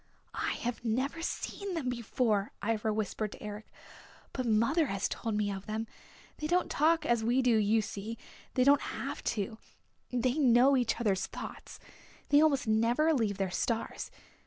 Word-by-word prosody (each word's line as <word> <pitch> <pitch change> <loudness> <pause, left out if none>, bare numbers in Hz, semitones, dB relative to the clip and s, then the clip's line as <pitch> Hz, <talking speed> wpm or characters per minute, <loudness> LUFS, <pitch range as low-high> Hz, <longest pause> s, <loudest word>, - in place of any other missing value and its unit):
"I - - -1
have 245 -1 -3
never 260 +8 -1
seen 390 +2 -4
them 305 -6 -2
before," 235 -3 0
Ivra 220 -1 +1
whispered 215 0 -2
to - - -12
Eric. 210 0 -7 0.7
"But 255 -2 -2
mother 235 +9 +3
has 195 -2 -1
told 225 -3 -3
me 210 -1 0
of 195 +1 -6
them. 220 +1 -2 0.5
They 305 - -2
don't 360 +3 +1
talk 315 +1 +3
as 235 -4 +2
we 245 +3 +2
do 250 - +4
you 215 +1 +3
see. 220 +1 -6 0.4
They 255 - +4
don't 280 +2 +5
have - - -5
to. 220 +1 -3 0.5
They 250 +3 +1
know 260 0 +5
each 245 -3 +1
other's 195 -5 +1
thoughts. - - -8 0.5
They 290 +1 +6
almost 285 -5 +3
never 235 +9 +3
leave 220 -8 0
their 195 -2 -1
Stars. 225 +5 -2
235 Hz, 165 wpm, -31 LUFS, 215-270 Hz, 0.7 s, They